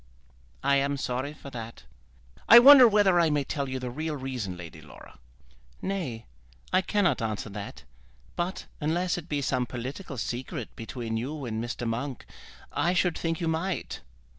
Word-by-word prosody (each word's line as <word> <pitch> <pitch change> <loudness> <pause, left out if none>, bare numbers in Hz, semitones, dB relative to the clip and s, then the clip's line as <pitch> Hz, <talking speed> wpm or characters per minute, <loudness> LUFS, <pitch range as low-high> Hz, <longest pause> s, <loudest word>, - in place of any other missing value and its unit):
"I 140 0 +4
am 140 +1 0
sorry 130 +2 -2
for 140 -2 -11
that." 115 -2 -8 0.7
"I 235 - +11
wonder 260 0 +10
whether 200 -4 +4
I 165 -2 +4
may 145 -1 +1
tell 140 0 -3
you 130 - -3
the 125 -1 -5
real 155 +4 -3
reason, 125 -9 -4
Lady 80 -2 -10
Laura." 75 -3 -15 0.6
"Nay; 160 -13 -4 0.5
I 185 - +5
cannot 200 - +1
answer 110 -1 -3
that; 100 0 -8 0.5
but 175 +2 -3
unless 175 +4 0
it 170 0 -13
be 145 -2 -1
some 125 -2 0
political 130 +6 -6
secret 120 +2 -5
between 115 -1 -4
you 140 +4 -4
and 110 -1 -3
Mr. 120 0 -4
Monk, 125 +3 -4 0.5
I 175 +2 +1
should 180 -1 +2
think 165 -1 -2
you 170 - -1
might." 165 +3 -2
140 Hz, 165 wpm, -27 LUFS, 120-170 Hz, 0.7 s, I